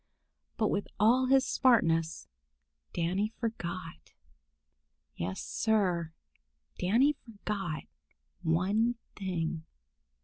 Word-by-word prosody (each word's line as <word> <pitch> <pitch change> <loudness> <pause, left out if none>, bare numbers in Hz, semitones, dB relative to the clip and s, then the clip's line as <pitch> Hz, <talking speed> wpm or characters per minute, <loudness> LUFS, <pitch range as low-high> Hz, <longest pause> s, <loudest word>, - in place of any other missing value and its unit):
But 215 -2 +2
with 200 - -1
all 245 +5 +5
his 265 0 +5
smartness, 165 -10 +2 0.6
Danny 180 +5 0
forgot. 185 -7 -5 1.0
Yes, 90 +2 -3
Sir, 185 -7 +1 0.7
Danny 235 +11 +4
forgot 200 - -5 0.6
one 200 +9 +2 0.2
thing. 170 -4 -2
195 Hz, 75 wpm, -31 LUFS, 165-225 Hz, 1.0 s, all